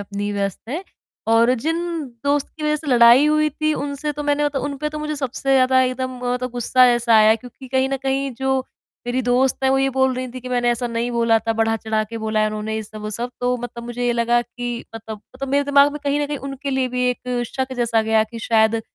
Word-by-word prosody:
अपनी 205 Hz, 0 st, -4 dB
व्यस्त 200 Hz, -2 st, -2 dB
हैं" 335 Hz, +9 st, -4 dB, 0.5 s
और 235 Hz, +2 st, +5 dB
जिन 325 Hz, +2 st, 0 dB, 0.5 s
दोस्त 285 Hz, 0 st, +1 dB
की 310 Hz, -, -8 dB
वजह 300 Hz, 0 st, +1 dB
से 305 Hz, 0 st, -10 dB
लड़ाई 245 Hz, +2 st, +6 dB
हुई 305 Hz, 0 st, +3 dB
थी, 310 Hz, +1 st, -1 dB
उनसे 285 Hz, +1 st, -3 dB
तो 295 Hz, -, -5 dB
मैंने 290 Hz, 0 st, +1 dB
त -, -, -2 dB
उन 280 Hz, +1 st, -2 dB
पे 300 Hz, -, -2 dB
तो 305 Hz, 0 st, -6 dB
मुझे 305 Hz, 0 st, -3 dB
सबसे 270 Hz, 0 st, -2 dB
ज़्यादा 260 Hz, 0 st, +4 dB
एकदम 255 Hz, 0 st, -1 dB
मतलब 250 Hz, +1 st, -1 dB
गुस्सा 250 Hz, +1 st, +3 dB
ऐसा 240 Hz, -1 st, +3 dB
आया 215 Hz, 0 st, +6 dB
क्योंकि 250 Hz, +3 st, -11 dB
कहीं 265 Hz, 0 st, +1 dB
न 270 Hz, -, -1 dB
कहीं 270 Hz, 0 st, -1 dB
जो 265 Hz, +1 st, 0 dB, 0.4 s
मेरी 250 Hz, +1 st, 0 dB
दोस्त 250 Hz, +2 st, +2 dB
है, -, -, +4 dB
वो 270 Hz, -, +3 dB
ये 270 Hz, -, +2 dB
बोल 265 Hz, 0 st, +1 dB
रही 255 Hz, 0 st, -4 dB
थी 255 Hz, +1 st, -8 dB
कि, 255 Hz, -, -8 dB
"मैंने 245 Hz, -1 st, +1 dB
ऐसा 240 Hz, +1 st, -1 dB
नहीं 235 Hz, +1 st, -2 dB
बोला 230 Hz, -1 st, +3 dB
था, 225 Hz, +1 st, -2 dB
बढ़ा-चढ़ा 225 Hz, -1 st, 0 dB
के 230 Hz, +1 st, -7 dB
बोला 215 Hz, 0 st, -1 dB
है, 215 Hz, -, +3 dB
उन्होंने 215 Hz, +1 st, -3 dB
ये 220 Hz, -, -2 dB
सब, 215 Hz, 0 st, -11 dB
वो 210 Hz, 0 st, -5 dB
सब," 235 Hz, +3 st, -3 dB
तो 250 Hz, 0 st, +1 dB
मतलब 240 Hz, 0 st, -7 dB
मुझे 245 Hz, 0 st, -3 dB
ये 240 Hz, -, +2 dB
लगा 235 Hz, 0 st, +2 dB
कि 240 Hz, 0 st, -6 dB
मतलब, 220 Hz, -2 st, -8 dB
मतलब 275 Hz, +1 st, -5 dB
मेरे 285 Hz, +1 st, +2 dB
दिमाग 285 Hz, 0 st, +5 dB
में 295 Hz, -, -5 dB
कहीं 285 Hz, +1 st, +1 dB
न 290 Hz, -, 0 dB
कहीं 290 Hz, -1 st, -4 dB
उनके 275 Hz, +1 st, -5 dB
लिए 265 Hz, -1 st, 0 dB
भी 250 Hz, 0 st, +1 dB
एक 250 Hz, 0 st, -3 dB
शक 260 Hz, +2 st, -4 dB
जैसा 230 Hz, -2 st, +1 dB
गया 220 Hz, 0 st, +3 dB
कि 230 Hz, -, -7 dB
शायद 225 Hz, 0 st, +2 dB
250 Hz, 245 wpm, -21 LUFS, 230-275 Hz, 0.5 s, लड़ाई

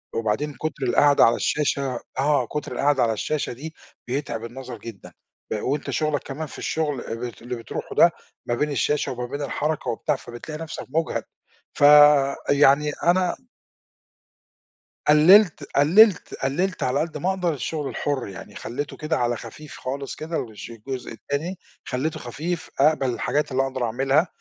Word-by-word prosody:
وبعدين 115 Hz, +7 st, -1 dB
كُتر 155 Hz, -3 st, -4 dB
القعدة 140 Hz, +3 st, +5 dB
على 115 Hz, -, +4 dB
الشاشة 140 Hz, -3 st, 0 dB, 0.2 s
آه، 140 Hz, -3 st, +2 dB
كُتر 150 Hz, 0 st, -5 dB
القعدة 140 Hz, -3 st, +2 dB
على 115 Hz, -1 st, +2 dB
الشاشة 145 Hz, +4 st, -2 dB
دي 155 Hz, +6 st, -9 dB, 0.3 s
بيتعب 125 Hz, -3 st, -3 dB
النظر 125 Hz, 0 st, -8 dB
جدًا، 110 Hz, -3 st, -10 dB, 0.4 s
أ 105 Hz, -, -2 dB
وأنت 140 Hz, +3 st, -2 dB
شُغلك 155 Hz, -2 st, 0 dB
كمان 150 Hz, +3 st, -5 dB
في -, -, -11 dB
الشغل 150 Hz, -5 st, -1 dB
اللي 120 Hz, +1 st, -5 dB
اللي 125 Hz, +1 st, -5 dB
بتروحه 115 Hz, -, -6 dB
ده -, -, +6 dB, 0.4 s
ما 120 Hz, -, +1 dB
بين 150 Hz, +3 st, -1 dB
الشاشة 145 Hz, 0 st, 0 dB
وما 125 Hz, -1 st, -4 dB
بين 140 Hz, +3 st, -5 dB
الحركة 150 Hz, +1 st, -2 dB
وبتاع، 115 Hz, -, -1 dB
فبتلاقي 150 Hz, +7 st, -8 dB
نَفْسك 160 Hz, -, -7 dB
مجهَد، 160 Hz, +3 st, -1 dB, 0.5 s
فيعني 145 Hz, 0 st, +5 dB
أنا 180 Hz, +1 st, +3 dB, 1.7 s
قلّلت 170 Hz, +5 st, +6 dB
قلّلت 180 Hz, +7 st, +5 dB
قلّلت 180 Hz, +8 st, 0 dB
على 130 Hz, +3 st, +1 dB
قدّ 160 Hz, -1 st, -2 dB
ما 180 Hz, +6 st, -1 dB
أقدر 180 Hz, -3 st, 0 dB
الشغل 145 Hz, +1 st, -3 dB
الحُر، 140 Hz, -6 st, -2 dB
يعني 95 Hz, -, -10 dB
خلّيته 140 Hz, +5 st, -5 dB
كده 155 Hz, +1 st, -1 dB
على 120 Hz, -1 st, 0 dB
خفيف 150 Hz, +6 st, -10 dB
خالص 135 Hz, +2 st, -4 dB
كده، 160 Hz, +1 st, -3 dB
الش 105 Hz, -, -9 dB
الجزء 125 Hz, +3 st, -6 dB
التاني 145 Hz, +10 st, -4 dB, 0.3 s
خلّيته 140 Hz, +5 st, -2 dB
خفيف، 155 Hz, +8 st, -4 dB
أقبَل 140 Hz, -2 st, +3 dB
الحاجات 150 Hz, +2 st, -1 dB
اللي 135 Hz, +1 st, +2 dB
أقدر 130 Hz, -2 st, -3 dB
أعملها، 135 Hz, +8 st, +2 dB
145 Hz, 150 wpm, -24 LUFS, 125-155 Hz, 1.7 s, ده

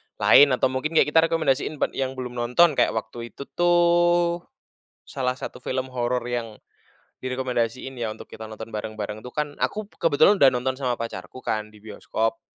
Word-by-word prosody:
lain, 145 Hz, -, +7 dB
atau 130 Hz, -, +1 dB
mungkin 155 Hz, +5 st, -3 dB
kayak 150 Hz, -, +4 dB
kita 165 Hz, 0 st, +5 dB
rekomendasiin 155 Hz, -2 st, 0 dB
buat -, -, -1 dB
yang 130 Hz, 0 st, -3 dB
belum 125 Hz, -1 st, -6 dB
nonton. 125 Hz, +8 st, +4 dB
Kayak -, -, +3 dB
waktu 115 Hz, +1 st, -6 dB
itu 140 Hz, -, -7 dB
tuh, 175 Hz, 0 st, +3 dB, 0.6 s
salah 125 Hz, -1 st, -2 dB
satu 130 Hz, -, -8 dB
film 130 Hz, +1 st, -3 dB
horor 125 Hz, 0 st, -1 dB
yang, 115 Hz, -3 st, -4 dB, 0.6 s
direkomendasiin 130 Hz, 0 st, -2 dB
ya, 115 Hz, -3 st, -3 dB
untuk -, -, -10 dB
kita 110 Hz, -, -10 dB
nonton 110 Hz, 0 st, -8 dB
bareng-bareng 105 Hz, 0 st, -5 dB
tuh 125 Hz, -, -9 dB
kan? 150 Hz, 0 st, -3 dB
Aku 210 Hz, -1 st, -2 dB
kebetulan 165 Hz, +2 st, +3 dB
udah 140 Hz, -9 st, +6 dB
nonton 130 Hz, +1 st, -1 dB
sama 125 Hz, -3 st, -2 dB
pacarku 115 Hz, 0 st, -6 dB
kan, 110 Hz, -3 st, -3 dB
di 105 Hz, -, -17 dB
bioskop. 110 Hz, +1 st, -3 dB
130 Hz, 170 wpm, -24 LUFS, 115-150 Hz, 0.6 s, lain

